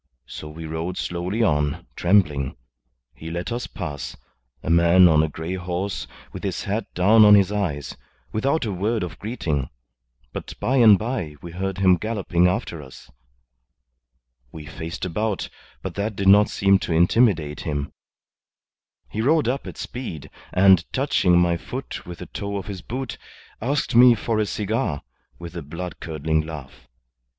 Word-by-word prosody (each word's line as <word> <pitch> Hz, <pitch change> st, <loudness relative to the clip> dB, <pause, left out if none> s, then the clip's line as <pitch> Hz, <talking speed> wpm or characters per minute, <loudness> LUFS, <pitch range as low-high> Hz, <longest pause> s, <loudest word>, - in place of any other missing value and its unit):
So 75 Hz, -, -8 dB
we 80 Hz, +1 st, -8 dB
rode 80 Hz, +3 st, -4 dB
slowly 90 Hz, +6 st, -2 dB
on, 75 Hz, -2 st, 0 dB
trembling. 75 Hz, -9 st, +2 dB, 0.6 s
He 80 Hz, -, -9 dB
let 85 Hz, +6 st, -4 dB
us 120 Hz, +1 st, -3 dB
pass 70 Hz, -, -6 dB, 0.5 s
a -, -, -4 dB
man 85 Hz, +2 st, +6 dB
on 80 Hz, -2 st, +5 dB
a 80 Hz, -, +1 dB
grey 80 Hz, +4 st, -5 dB
horse 95 Hz, +1 st, -3 dB, 0.3 s
with -, -, -7 dB
his -, -, -2 dB
hat 105 Hz, +1 st, -3 dB
down 105 Hz, +5 st, +6 dB
on 105 Hz, 0 st, +9 dB
his 100 Hz, -1 st, +4 dB
eyes 75 Hz, -11 st, -2 dB, 0.4 s
without 135 Hz, +6 st, 0 dB
a 105 Hz, -, -2 dB
word 105 Hz, +4 st, -1 dB
of 90 Hz, -, -7 dB
greeting; 85 Hz, -, -2 dB, 0.6 s
but -, -, -7 dB
by 135 Hz, -, +1 dB
and 110 Hz, -5 st, +8 dB
by 90 Hz, -, -3 dB
we 85 Hz, -, -7 dB
heard 95 Hz, +2 st, -3 dB
him 95 Hz, -2 st, +4 dB
galloping 95 Hz, -4 st, +1 dB
after 90 Hz, -4 st, -2 dB
us. 65 Hz, -2 st, -14 dB, 1.4 s
We 80 Hz, -2 st, -9 dB
faced 80 Hz, +4 st, -6 dB
about, 105 Hz, +3 st, -2 dB, 0.3 s
but -, -, -4 dB
that 105 Hz, +1 st, -3 dB
did 100 Hz, 0 st, -1 dB
not 105 Hz, +2 st, +7 dB
seem 100 Hz, -1 st, +3 dB
to 85 Hz, -, -2 dB
intimidate 85 Hz, -3 st, +3 dB
him. 75 Hz, -2 st, -3 dB, 1.1 s
He 110 Hz, -, -3 dB
rode 150 Hz, +4 st, +3 dB
up 135 Hz, +3 st, -2 dB
at -, -, -8 dB
speed, 120 Hz, -, -6 dB, 0.2 s
and 95 Hz, -2 st, +5 dB
touching 100 Hz, -10 st, +2 dB
my 85 Hz, -1 st, +3 dB
foot -, -, -7 dB
with 90 Hz, -1 st, -7 dB
the -, -, -8 dB
toe 100 Hz, -1 st, -5 dB
of 95 Hz, -, -5 dB
his 95 Hz, -2 st, -6 dB
boot, 130 Hz, +1 st, -5 dB, 0.4 s
asked 140 Hz, +5 st, -1 dB
me 120 Hz, 0 st, +8 dB
for 110 Hz, 0 st, -1 dB
a 105 Hz, -, +1 dB
cigar, 100 Hz, -10 st, -2 dB, 0.3 s
with 85 Hz, +1 st, -9 dB
a 85 Hz, -, -4 dB
blood 85 Hz, +5 st, -7 dB
curdling 80 Hz, -1 st, -1 dB
laugh. 75 Hz, -4 st, -10 dB
90 Hz, 160 wpm, -23 LUFS, 80-105 Hz, 1.4 s, on